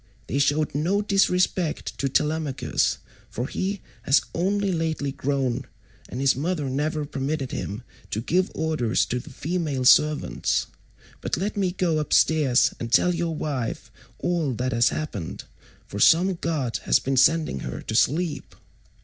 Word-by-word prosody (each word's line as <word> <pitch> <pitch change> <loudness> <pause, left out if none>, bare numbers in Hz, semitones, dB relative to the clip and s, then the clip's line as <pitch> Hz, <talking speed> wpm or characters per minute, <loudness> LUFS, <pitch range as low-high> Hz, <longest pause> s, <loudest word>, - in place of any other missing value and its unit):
They 140 - -2
showed 145 +2 +1
no 180 +8 +1
disrespect 185 -4 +1
to 135 - 0
Telemachus, 150 0 0 0.3
for 120 - -3
he 195 +7 -3 0.2
has 135 - +3
only 195 +3 0
lately 160 -4 -1
grown 135 -2 -1 0.4
and 125 - -5
his 135 -1 +3
mother 150 +1 -2
never 150 +2 -1
permitted 140 0 -3
him 105 +5 -5 0.3
to 110 - -2
give 180 +10 +1
orders 155 -8 +1
to 125 - -2
the - - -11
female 150 -3 -2
servants; 150 +3 +3 0.6
but - - -1
let 195 +5 -2
me 195 -3 0
go 175 -3 0
upstairs 150 -3 +3
and 115 -1 -5
tell 180 +6 +4
your 170 -1 -2
wife 135 -7 -4 0.3
all 165 -6 -1
that 125 +3 -2
has 115 0 +3
happened, 115 - -5 0.4
for 100 - -7
some 175 - +5
god 155 -8 -2
has - - +5
been 135 +1 -2
sending 155 - +3
her 65 - -5
to - - -5
sleep." 155 +8 0
150 Hz, 150 wpm, -24 LUFS, 130-170 Hz, 0.6 s, some